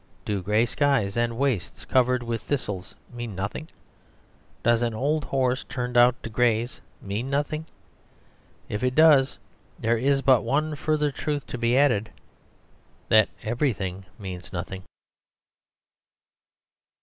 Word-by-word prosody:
Do 100 -2 -1
grey 105 +5 +2
skies 125 -6 +1
and 120 -1 0
wastes 130 -9 -1
covered 125 -1 +2
with 115 -2 -3
thistles 100 -10 -4 0.2
mean 120 -4 -6
nothing? 100 - -4 0.9
Does 120 0 +3
an 115 -2 -1
old 145 +5 0
horse 130 -2 0
turned 125 0 -4
out 120 0 +6
to - - -5
graze 120 0 +1 0.2
mean 105 +6 -3
nothing? 145 +3 -1 1.0
If 105 - -4
it 130 0 0
does, 150 -4 +5 0.4
there 115 0 +1
is 135 +2 +2
but 130 -4 +5
one 150 +6 0
further 150 0 0
truth 145 +1 -3
to - - -6
be 120 +2 +2
added 125 -7 +3 1.0
that 110 -1 +5
everything 100 -6 -2
means 95 -3 -7
nothing. 95 +1 -5
120 Hz, 125 wpm, -25 LUFS, 110-140 Hz, 1.0 s, out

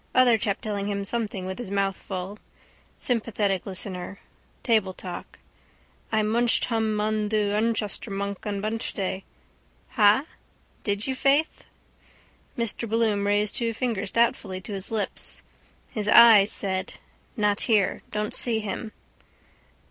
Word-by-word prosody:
Other 245 -3 +5
chap 200 -2 -1
telling 205 -2 -3
him 200 -1 -2
something 205 -4 -3
with 190 +3 -5
his 245 - -5
mouth 195 -1 0
full. 190 +2 -6 0.6
Sympathetic 210 -6 -1
listener. 190 0 -3 0.5
Table 215 -6 +2
talk. 180 -2 -8 0.7
I 220 -1 +2
munched 235 +2 +2
hum 220 -2 0
un 215 0 0
thu 210 -1 +1
Unchster 220 0 -1
Bunk 200 -1 -4
un 200 -1 -2
Munchday. 205 -3 -3 0.7
Ha? 215 +5 +4 0.6
Did 205 0 -1
you, 265 - -1
faith? 280 +4 +1 0.9
Mr 230 -1 0
Bloom 215 -3 +1
raised 205 0 +2
two 230 -3 0
fingers 235 -4 -2
doubtfully 210 -5 +1
to 205 - -7
his 195 -1 -5
lips. 220 -2 -4 0.5
His 210 -2 -3
eyes 215 -2 +8
said: 190 -2 0 0.4
—Not 210 -1 +1
here. 210 -4 +2
Don't 210 0 -3
see 230 -3 +2
him. 215 +1 -5
210 Hz, 130 wpm, -25 LUFS, 200-225 Hz, 0.9 s, eyes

